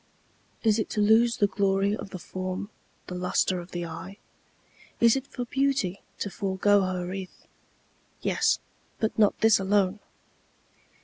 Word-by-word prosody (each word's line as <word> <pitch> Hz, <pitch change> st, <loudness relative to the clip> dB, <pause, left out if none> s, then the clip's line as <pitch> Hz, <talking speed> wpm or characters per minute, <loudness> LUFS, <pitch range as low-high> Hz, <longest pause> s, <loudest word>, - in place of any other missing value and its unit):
Is 220 Hz, -1 st, +3 dB
it 220 Hz, -, -2 dB
to 215 Hz, -, -2 dB
lose 225 Hz, +3 st, +4 dB
the 210 Hz, -, +4 dB
glory 200 Hz, 0 st, +1 dB
of 200 Hz, -, -8 dB
the 185 Hz, -, -6 dB
form, 185 Hz, +3 st, -5 dB, 0.3 s
The -, -, -7 dB
lustre 180 Hz, 0 st, 0 dB
of 175 Hz, +1 st, -9 dB
the 175 Hz, -1 st, -4 dB
eye? 170 Hz, +4 st, -8 dB, 0.8 s
Is 235 Hz, +1 st, +6 dB
it 270 Hz, 0 st, -3 dB
for 245 Hz, -, -5 dB
beauty 265 Hz, -8 st, 0 dB, 0.2 s
to 200 Hz, -, -4 dB
forego 200 Hz, +1 st, +2 dB
her 185 Hz, -1 st, -2 dB
wreath? 185 Hz, 0 st, -7 dB, 0.7 s
Yes, -, -, +2 dB, 0.4 s
but 220 Hz, -, 0 dB
not 210 Hz, -2 st, +4 dB
this 220 Hz, -2 st, +5 dB
alone. 195 Hz, 0 st, +1 dB
200 Hz, 145 wpm, -27 LUFS, 185-220 Hz, 0.8 s, Is